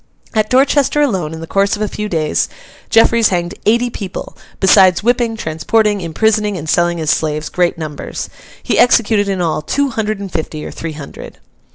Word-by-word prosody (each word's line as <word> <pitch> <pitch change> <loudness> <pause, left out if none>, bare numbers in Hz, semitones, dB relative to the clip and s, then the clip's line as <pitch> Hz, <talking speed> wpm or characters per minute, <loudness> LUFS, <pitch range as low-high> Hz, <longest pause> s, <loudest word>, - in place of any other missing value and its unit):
At 215 -1 +1
Dorchester 275 +2 +3
alone, 190 - 0
in 160 0 -7
the - - -5
course 200 +4 +1
of 210 - -3
a - - 0
few 210 +1 -5
days, 155 -4 0 0.4
Jeffreys 225 0 +4
hanged 175 -2 -2
eighty 235 +2 +2
people; 195 -4 -7 0.2
besides 190 -1 +5
whipping, 235 -1 +1
transporting, 205 +5 0
imprisoning, 210 +4 0
and 160 -2 -7
selling 175 +1 +1
as 160 -1 +1
slaves, 155 -1 -1
great 175 -1 0
numbers. 155 -3 -6 0.4
He - - 0
executed, 220 -4 +3
in 190 -2 -1
all, 160 -3 0
two 280 - 0
hundred 215 -3 -2
and 200 -2 -6
fifty, 155 -2 -4
or - - -6
three 165 -1 -6
hundred. 145 -2 -10
195 Hz, 180 wpm, -16 LUFS, 165-220 Hz, 0.4 s, besides